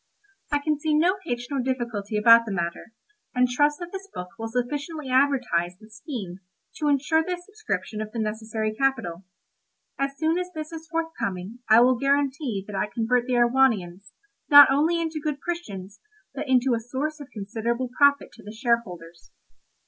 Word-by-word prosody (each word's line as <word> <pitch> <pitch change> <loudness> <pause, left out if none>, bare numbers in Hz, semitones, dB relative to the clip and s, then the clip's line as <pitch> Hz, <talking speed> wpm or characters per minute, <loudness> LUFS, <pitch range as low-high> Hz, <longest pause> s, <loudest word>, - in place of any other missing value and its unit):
I 290 - +3
can 295 0 -1
see 305 0 +1
no 360 +6 +3
hitch 245 -1 -3
nor 280 - -1
difficulty 235 -5 -2
about 230 +2 +7
the - - -3
matter, 170 +3 -4 0.4
and 250 0 +4
trust 290 +4 +2
that 350 0 -8
this 390 0 -7
book 180 0 -7
will 225 - -3
sufficiently 280 +5 -3
advertise 255 -11 +1
the 215 0 -17
scheme 215 - -7 0.4
to 300 - -1
insure 295 +3 +2
the 360 +1 -3
subscription 360 - -5
of 215 0 -6
the 235 - -7
necessary 220 0 -2
capital; 215 -9 -1 0.7
as 275 0 -2
soon 320 +3 +1
as 360 0 -4
this 310 0 -6
is 325 0 -8
forthcoming 240 - -4
I 220 +2 +8
will 250 0 +4
guarantee 275 -5 0
that 205 - -8
I 195 +2 0
convert 240 +1 0
the 255 - -1
Erewhonians 235 -7 +2 0.4
not 290 -2 +10
only 315 +5 +2
into 320 -2 -3
good 300 -2 -2
Christians 210 - -6 0.3
but - - -5
into 255 0 +3
a 230 - +1
source 270 +7 -4
of 285 -1 -10
considerable 230 +4 -3
profit 285 0 +3
to - - -16
the 205 - -8
shareholders. 195 -8 -3
250 Hz, 170 wpm, -25 LUFS, 215-295 Hz, 0.7 s, not